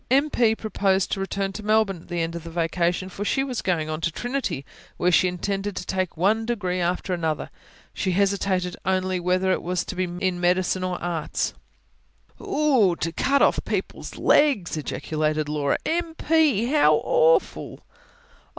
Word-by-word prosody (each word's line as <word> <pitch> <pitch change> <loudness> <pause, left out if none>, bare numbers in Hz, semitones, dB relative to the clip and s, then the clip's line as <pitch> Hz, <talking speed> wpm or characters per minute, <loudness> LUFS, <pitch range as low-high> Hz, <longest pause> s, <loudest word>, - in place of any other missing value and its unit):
M. 280 +4 +3
P. 225 -2 +3
proposed 195 -3 0
to 195 - -1
return 195 0 -2
to 215 - -6
Melbourne 215 -4 +1
at - - -18
the 175 -1 -2
end 165 0 -2
of 170 - -6
the 170 - -8
vacation; 170 +2 0
for 190 +2 -6
she 270 +6 +1
was 255 -4 -3
going 165 -4 0
on 155 +1 -4
to 165 - 0
Trinity, 240 - -3 0.3
where 180 - +2
she 185 - +4
intended 195 +2 -3
to 180 - -5
take 185 -3 -2
one 210 +6 +2
degree 200 -6 -2
after 180 +2 -1
another. 160 -3 -2 0.4
She 185 - -1
hesitated 190 -2 0
only 185 0 0
whether 185 +2 +1
it - - 0
was 180 0 -2
to - - -6
be 185 0 0
in 180 0 -2
medicine 180 +1 +1
or 180 -1 -2
arts. 170 -3 -2 0.9
"Oogh!... 260 - +2
to 165 - -1
cut 275 +10 +2
off - - +2
people's - - -4
legs!" 270 - +3
ejaculated 155 0 -2
Laura. 145 -2 0
"M. 335 0 -1
P., 305 -10 +2
how 290 +4 +4
awful." - - +2
185 Hz, 170 wpm, -24 LUFS, 175-220 Hz, 0.9 s, she